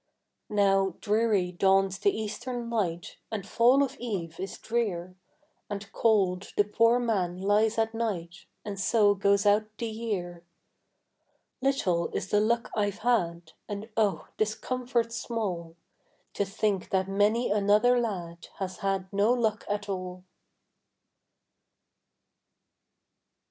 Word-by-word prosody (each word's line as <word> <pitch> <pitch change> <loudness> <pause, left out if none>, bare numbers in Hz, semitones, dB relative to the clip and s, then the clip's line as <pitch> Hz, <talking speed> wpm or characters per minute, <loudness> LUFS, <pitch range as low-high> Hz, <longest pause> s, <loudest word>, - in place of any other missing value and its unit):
Now 195 -3 +2
dreary 210 -4 +1
dawns 195 +1 +2
the 405 - +3
eastern 235 - -4
light, 175 -7 -2
And 205 -3 -4
fall 245 +5 +4
of 275 0 -3
eve 180 -9 -4
is 190 +1 -5
drear, 185 -6 -2 0.5
And 200 -1 -6
cold 195 -5 +1
the 205 - +6
poor 230 +3 +3
man 195 -8 0
lies 210 +3 +2
at 225 0 +1
night, 180 -7 -4 0.2
And 200 -2 -5
so 205 +1 +4
goes 200 +1 +2
out 210 +1 +4
the 235 - -3
year. 205 -7 -4 1.2
Little 190 -11 +1
is 190 - -3
the 210 - +4
luck 235 +3 +1
I've 205 -2 0
had, 175 -8 0 0.2
And 205 +2 -5
oh, 210 -3 +1
'tis 215 0 +1
comfort 245 -2 -1
small 185 -9 -3 0.6
To 200 - 0
think 200 0 -1
that 190 0 +1
many 205 +5 +2
another 210 +4 +4
lad 175 -7 -4
Has 185 -2 -4
had 195 -1 -1
no 205 +3 +3
luck 225 -3 0
at 205 0 -2
all. 185 -2 -5
205 Hz, 125 wpm, -28 LUFS, 190-225 Hz, 1.2 s, the